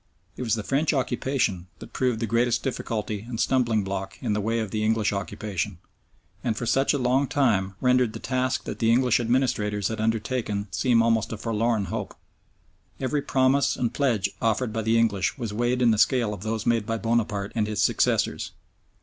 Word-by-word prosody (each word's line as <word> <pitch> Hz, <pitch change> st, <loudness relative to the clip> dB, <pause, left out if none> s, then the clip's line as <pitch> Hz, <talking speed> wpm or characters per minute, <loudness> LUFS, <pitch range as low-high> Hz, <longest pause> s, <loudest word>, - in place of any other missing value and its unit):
It -, -, -7 dB
was 115 Hz, -3 st, +1 dB
the 110 Hz, -, -4 dB
French 145 Hz, +6 st, +1 dB
occupation 120 Hz, -8 st, -1 dB
that -, -, -12 dB
proved 125 Hz, -3 st, 0 dB
the -, -, +1 dB
greatest 115 Hz, +2 st, +1 dB
difficulty 110 Hz, -5 st, -3 dB
and 115 Hz, -2 st, -4 dB
stumbling 115 Hz, -5 st, +2 dB
block 95 Hz, 0 st, -4 dB
in 115 Hz, -5 st, -1 dB
the 105 Hz, -, 0 dB
way 115 Hz, +3 st, 0 dB
of 110 Hz, -4 st, -3 dB
the 110 Hz, 0 st, -1 dB
English 110 Hz, -1 st, +1 dB
occupation, 100 Hz, -1 st, -3 dB, 0.7 s
and 115 Hz, -4 st, -1 dB
for 120 Hz, -, -3 dB
such 135 Hz, +4 st, +2 dB
a 145 Hz, -, +1 dB
long 130 Hz, +2 st, +2 dB
time 100 Hz, -10 st, +1 dB
rendered 125 Hz, -3 st, +2 dB
the -, -, -6 dB
task 130 Hz, 0 st, -1 dB
that -, -, -6 dB
the 115 Hz, -1 st, +3 dB
English 125 Hz, 0 st, +3 dB
administrators 110 Hz, -5 st, 0 dB
had 110 Hz, -1 st, -3 dB
undertaken 110 Hz, -2 st, -1 dB
seem 115 Hz, +3 st, +3 dB
almost 115 Hz, -2 st, +1 dB
a 115 Hz, -, -4 dB
forlorn 115 Hz, -1 st, 0 dB
hope. 105 Hz, -3 st, -4 dB, 0.8 s
Every 140 Hz, +2 st, 0 dB
promise 135 Hz, +1 st, +2 dB
and 120 Hz, -, -1 dB
pledge 115 Hz, -9 st, +1 dB
offered 115 Hz, +1 st, 0 dB
by 110 Hz, -, -1 dB
the 110 Hz, +1 st, +2 dB
English 100 Hz, -6 st, +1 dB
was 115 Hz, -5 st, -4 dB
weighed 120 Hz, +3 st, 0 dB
in 120 Hz, -, +5 dB
the 110 Hz, -, +1 dB
scale 120 Hz, -4 st, +3 dB
of 100 Hz, -, -8 dB
those 110 Hz, +1 st, -3 dB
made 115 Hz, -3 st, +1 dB
by 115 Hz, -, -1 dB
Bonaparte 110 Hz, -3 st, -1 dB
and 110 Hz, -3 st, 0 dB
his 105 Hz, -2 st, 0 dB
successors. -, -, +1 dB
115 Hz, 190 wpm, -25 LUFS, 105-125 Hz, 0.8 s, in